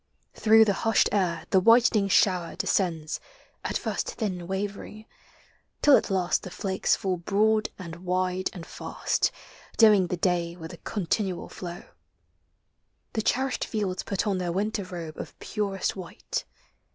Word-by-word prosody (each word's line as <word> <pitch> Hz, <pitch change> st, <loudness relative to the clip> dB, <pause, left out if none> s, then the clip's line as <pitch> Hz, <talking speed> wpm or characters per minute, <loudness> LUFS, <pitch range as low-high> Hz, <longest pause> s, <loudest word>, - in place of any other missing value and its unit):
Through 220 Hz, 0 st, +6 dB
the 205 Hz, -, +2 dB
hushed 225 Hz, -1 st, +3 dB
air 175 Hz, -5 st, 0 dB
the 190 Hz, -, +6 dB
whitening 225 Hz, 0 st, +5 dB
shower 180 Hz, -3 st, +2 dB
de -, -, -3 dB
scends 165 Hz, -5 st, 0 dB, 0.4 s
At -, -, -1 dB
first -, -, -3 dB
thin 185 Hz, -6 st, -3 dB
wavering; 205 Hz, +2 st, -5 dB, 0.8 s
till 290 Hz, -2 st, +8 dB
at -, -, +1 dB
last 185 Hz, -2 st, +1 dB
the -, -, -7 dB
flakes 190 Hz, +1 st, 0 dB
Fall 185 Hz, -2 st, -1 dB
broad 215 Hz, +5 st, +2 dB
and 170 Hz, -3 st, -8 dB
wide 185 Hz, +1 st, -1 dB
and 175 Hz, -3 st, -9 dB
fast, -, -, -1 dB, 0.5 s
dimming 210 Hz, -5 st, +6 dB
the 180 Hz, -, -2 dB
day 170 Hz, -1 st, 0 dB
With 160 Hz, -2 st, -9 dB
a -, -, -9 dB
continual 190 Hz, -1 st, -2 dB
flow. 175 Hz, -1 st, -7 dB, 1.3 s
The 220 Hz, -, 0 dB
cherished 265 Hz, +4 st, 0 dB
fields 200 Hz, -4 st, -2 dB
Put 195 Hz, -, -2 dB
on 195 Hz, -3 st, 0 dB
their 175 Hz, -1 st, -1 dB
winter 200 Hz, +2 st, -1 dB
robe 170 Hz, -4 st, -7 dB
of -, -, -8 dB
purest 200 Hz, -2 st, -2 dB
white. 185 Hz, -3 st, -5 dB
190 Hz, 150 wpm, -27 LUFS, 180-210 Hz, 1.3 s, till